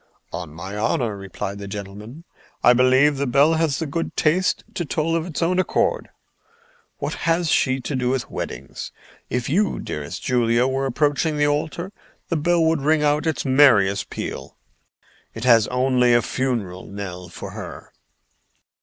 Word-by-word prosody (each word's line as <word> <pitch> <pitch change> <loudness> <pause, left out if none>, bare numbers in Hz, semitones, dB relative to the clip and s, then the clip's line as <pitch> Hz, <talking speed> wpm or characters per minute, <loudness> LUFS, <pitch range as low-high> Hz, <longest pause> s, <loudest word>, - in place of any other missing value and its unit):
"On 85 -4 -5
my 95 +6 -7
honor," 110 +1 0
replied 100 +1 -6
the 100 - -7
gentleman, 105 +8 -8 0.4
"I 125 - +7
believe 130 +3 +4
the 140 0 -1
bell 140 +6 +4
has 160 -4 +1
the 160 - -2
good 165 +3 -4
taste 175 +4 +2
to 175 - -2
toll 160 +1 -1
of 165 +1 -1
its 170 0 -3
own 180 +2 +1
accord. - - 0 0.9
What - - -3 0.2
has 165 -1 +2
she 130 0 +2
to 140 - -3
do 125 -1 0
with 130 -1 -1
weddings? - - -6 0.4
If 125 -1 -2
you, 195 +8 +1
dearest 75 +4 -6
Julia, 120 -1 +2
were 135 +1 0
approaching 150 +3 +1
the 145 - +3
altar, 155 +5 -1 0.4
the 170 - 0
bell 170 +2 +2
would 160 -2 +2
ring 155 +1 +2
out 150 +2 +2
its 160 - -1
merriest 120 -8 +4
peal. - - -6 0.8
It 115 - -6
has 115 -4 +5
only 125 -1 +3
a 120 - +3
funeral 115 -10 -2
knell 90 -3 -7
for 85 -1 -8
her." - - -9
130 Hz, 165 wpm, -22 LUFS, 110-155 Hz, 0.9 s, I